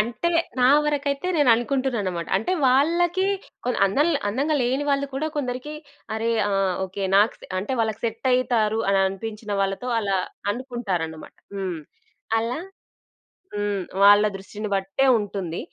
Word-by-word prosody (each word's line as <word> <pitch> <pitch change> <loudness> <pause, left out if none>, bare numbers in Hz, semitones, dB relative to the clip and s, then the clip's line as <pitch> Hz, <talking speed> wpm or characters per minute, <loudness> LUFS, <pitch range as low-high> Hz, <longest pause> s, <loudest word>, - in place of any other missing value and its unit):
అంటే 240 +9 -1 0.3
నా 250 - +6 0.2
వరకైతే 285 +1 -1
నేననుకుంటుననమాట. 240 - +1
అంటే 220 - -1
వాళ్ళకి 340 +8 +3 0.4
కొ 250 - 0 0.2
అందంగ, 290 - +2 0.2
అందంగా 275 +9 0
లేని 260 +4 0
వాళ్ళు 280 0 +1
కూడా 310 +3 -1
కొందరికి 260 +1 -3 0.4
అరె! 225 +1 -1 0.2
ఆహ్, 195 -2 +1
ఓకే. 190 +1 -6
నాక్ 210 +3 +4
సె - - -12
అంటే 200 +7 -3
వాళ్ళకి 220 -2 -1
సెట్ 230 +3 -2
అయితారు 225 -3 +1
అని 195 - +3
అనిపించిన 210 +2 -5
వాళ్ళతో 195 +5 -1
అలా 200 -3 0 0.3
అనుకుంటారన్నమాట. 205 -10 -4 0.2
హ్మ్. 185 -4 -3 0.6
అలా 230 +4 -2 1.0
హ్మ్. 205 -1 -1 0.2
వాళ్ళ 205 +1 +7
దృష్టిని 205 +2 -6
బట్టే 195 +7 0
ఉంటుంది. 195 -5 -4
225 Hz, 130 wpm, -24 LUFS, 195-265 Hz, 1.0 s, వాళ్ళ